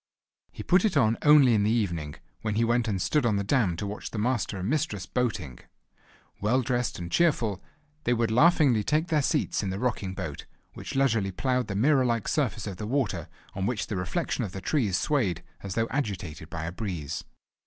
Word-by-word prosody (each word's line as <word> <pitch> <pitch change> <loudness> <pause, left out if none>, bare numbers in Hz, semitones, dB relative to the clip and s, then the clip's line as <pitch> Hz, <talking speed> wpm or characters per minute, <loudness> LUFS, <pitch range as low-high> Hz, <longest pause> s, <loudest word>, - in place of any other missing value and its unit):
He - - -8
put 180 +1 +4
it 215 -8 +2
on 115 -4 +4
only 145 -5 +7
in 105 - +3
the 105 - +2
evening, 85 -10 -1 0.3
when 110 -2 -2
he 115 - +2
went 120 0 +1
and 100 -4 -1
stood 150 - +1
on 115 -3 +2
the 100 - 0
dam 105 -5 +2
to 100 - -3
watch 100 +1 -5
the - - -7
Master 110 -2 0
and 95 +1 -3
Mistress 130 - -1
boating. 95 - -2 0.8
Well 125 +6 +2
dressed 125 0 -1
and 85 0 -6
cheerful 120 - +2 0.4
they 120 - +3
would 115 -1 0
laughingly 130 -3 +4
take 155 +7 0
their 155 -2 +3
seats 150 +2 0
in 100 - -2
the 95 - -3
rocking 105 -5 -2
boat, - - -6 0.3
which - - -7
leisurely 115 -7 +2
ploughed 125 +4 0
the 100 - -4
mirror 135 +5 +4
like 115 -3 0
surface 125 -8 0
of 100 -4 -5
the 105 - -5
water 110 - -1 0.3
on 95 0 -2
which 120 -2 -1
the 105 - -4
reflection 90 -2 -2
of 95 - -5
the 95 - -5
trees 110 - +1
swayed 115 - 0 0.2
as 100 -2 -5
though 115 0 +1
agitated 90 - -3
by 80 -1 -5
a 85 - -3
breeze. 90 -7 -4
110 Hz, 205 wpm, -27 LUFS, 95-130 Hz, 0.8 s, only